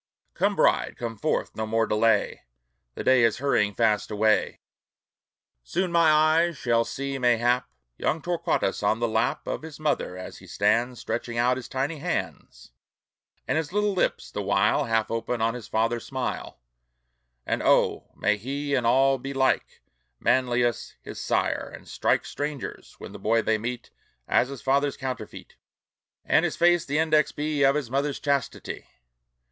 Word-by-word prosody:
Come, - - +1
bride, - - +2
come 115 -2 -4
forth! 155 +9 -2
no 110 0 -3
more 115 +1 +1
delay! 105 -1 +1 0.5
The - - -5
day 130 -1 +5
is 115 -2 +3
hurrying 110 -7 +1
fast 110 -3 +1
away! 110 +1 +1 1.0
Soon 180 - -1
my 170 -2 +5
eyes 155 +2 +3
shall 115 -2 +1
see, 135 +3 -4
mayhap, 125 +1 +2 0.3
Young 160 - 0
Torquatus 170 - -1
on 105 +1 +2
the 120 - +1
lap 115 +2 0
Of - - -3
his 160 -1 -10
mother, 145 -11 -1
as 95 - -8
he - - -15
stands 115 +4 +1
Stretching 120 0 -4
out 125 +2 +3
his 130 -1 -7
tiny 140 +4 -2
hands, 95 - -5 0.8
And - - +1
his 160 -1 -4
little 210 +1 +1
lips 185 - -1
the - - -3
while - - +2
Half 115 -1 0
open 115 +1 -2
on 115 +1 +1
his 120 -4 -8
father 115 +2 0
smile. 130 +1 -5 0.9
And - - -1
oh! - - +2
may 105 0 +1
he 140 +6 -4
in 125 -4 +2
all 135 +2 +4
be 135 +2 -6
like 130 0 0 0.4
Manlius 120 -2 +1
his - - -8
sire, - - -1
and - - -15
strike - - 0
Strangers, 145 -2 -6
when - - -9
the - - -10
boy 115 +1 +2
they 110 0 +1
meet, 120 +2 -5 0.4
As 125 - +2
his 140 -2 -8
father's 140 +1 +1
counterfeit, 130 -2 -7 0.7
And - - +3
his - - -1
face 175 0 +3
the 145 +2 0
index 155 -2 +3
be 150 0 -2
Of 135 0 +5
his 140 -6 -3
mother's 140 +1 -1
chastity! 140 -3 -2
125 Hz, 165 wpm, -26 LUFS, 115-145 Hz, 1.0 s, day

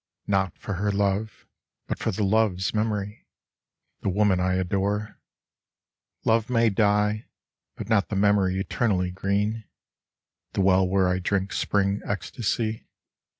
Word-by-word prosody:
Not 95 -3 0
for 100 - -5
her 105 0 +1
love, 100 +2 -1 0.4
but - - -4
for - - -1
the 105 0 -1
love's 100 -2 +1
memory, 105 -1 -2 0.7
The - - 0
woman 100 -1 +2
I 90 0 +1
adore; 100 +3 -1 1.1
Love 115 0 +2
may 115 -2 +3
die, 105 +1 +1 0.5
but - - -7
not 105 -3 +2
the 105 - -2
memory 100 -2 +2
eternally 95 -3 0
green— 100 +4 -1 0.9
The - - 0
well 95 0 +4
where 95 0 +2
I 90 0 +1
drink 95 +1 -1
Spring 100 0 0
ecstasy. 110 +1 -2
100 Hz, 130 wpm, -25 LUFS, 95-105 Hz, 1.1 s, well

